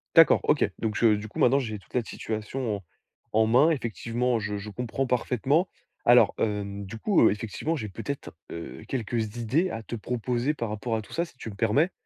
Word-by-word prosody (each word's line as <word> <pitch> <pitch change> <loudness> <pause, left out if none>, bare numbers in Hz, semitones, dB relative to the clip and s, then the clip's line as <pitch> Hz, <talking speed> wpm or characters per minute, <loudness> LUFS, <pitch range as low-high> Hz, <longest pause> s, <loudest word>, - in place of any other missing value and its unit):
D'accord, - - +7
OK, - - +3
donc 110 -2 -1
je 110 -3 +5
du 105 +1 -5
coup, - - -8
maintenant, 135 +3 +5
j'ai 110 -6 -4
toute - - -24
la 125 - +1
situation 110 +1 -3
en 100 - -14 0.5
en 110 +1 +4
main. 125 +8 +5
Effectivement, 120 -2 -1
je 105 -1 -3
je 100 +1 -6
comprends 125 +4 -2
parfaitement. 130 - +1 0.3
Alors, 120 +1 +6
hem, 100 -2 -2
du 110 +4 -7
coup, 200 - +3
heu, - - +2
effectivement, 115 +10 -2
j'ai 110 -6 -4
peut-être, 140 +8 -5 0.2
heu, 85 - -7
quelques 115 -2 -2
idées 135 - +1
à 115 -8 -5
te 120 - -5
proposer 125 +4 -1
par 120 -6 -3
rapport 110 +2 -2
à - - -3
tout 105 - -13
ça, 170 - +1
si 165 -6 -12
tu 115 - -7
me 100 - -9
permets? 120 - +2
115 Hz, 210 wpm, -27 LUFS, 105-130 Hz, 0.5 s, D'accord